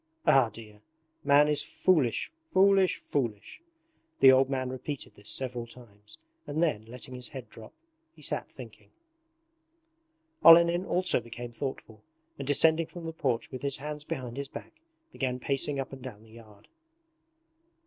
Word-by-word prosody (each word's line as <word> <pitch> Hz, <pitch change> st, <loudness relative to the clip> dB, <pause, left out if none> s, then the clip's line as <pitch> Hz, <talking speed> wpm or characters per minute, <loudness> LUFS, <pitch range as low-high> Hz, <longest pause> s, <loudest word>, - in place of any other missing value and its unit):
Ah, 135 Hz, -5 st, +5 dB
dear! 105 Hz, -1 st, -13 dB, 0.4 s
Man 145 Hz, +1 st, +5 dB
is 150 Hz, -1 st, +1 dB
foolish, 155 Hz, -, +1 dB, 0.2 s
foolish, 195 Hz, 0 st, +4 dB
foolish!' 120 Hz, -, -4 dB, 0.6 s
The 135 Hz, -1 st, +9 dB
old 130 Hz, 0 st, +4 dB
man 130 Hz, -2 st, -2 dB
repeated 130 Hz, +2 st, -6 dB
this 105 Hz, 0 st, -11 dB
several 125 Hz, -3 st, -4 dB
times 105 Hz, -4 st, -14 dB, 0.3 s
and 155 Hz, +3 st, 0 dB
then, 110 Hz, -10 st, 0 dB
letting 125 Hz, +3 st, -10 dB
his 125 Hz, -1 st, -7 dB
head 130 Hz, -4 st, -10 dB
drop, 110 Hz, -1 st, -11 dB, 0.4 s
he -, -, -16 dB
sat -, -, -3 dB
thinking. -, -, -13 dB, 1.5 s
Olenin 170 Hz, +2 st, +7 dB
also 180 Hz, -4 st, +1 dB
became 120 Hz, +1 st, -8 dB
thoughtful, 115 Hz, -3 st, -6 dB, 0.4 s
and 135 Hz, -, -5 dB
descending 160 Hz, +3 st, +3 dB
from 175 Hz, -2 st, -9 dB
the 165 Hz, -, -5 dB
porch 130 Hz, -7 st, -2 dB
with 130 Hz, -, -6 dB
his 140 Hz, -1 st, 0 dB
hands 150 Hz, +1 st, -6 dB
behind 125 Hz, -4 st, -5 dB
his 140 Hz, 0 st, -4 dB
back -, -, -10 dB, 0.4 s
began 130 Hz, -, -2 dB
pacing 140 Hz, +2 st, 0 dB
up 135 Hz, 0 st, -5 dB
and 135 Hz, -, -9 dB
down 115 Hz, -5 st, -9 dB
the 110 Hz, -, -19 dB
yard. 110 Hz, -3 st, -16 dB
130 Hz, 150 wpm, -29 LUFS, 115-150 Hz, 1.5 s, The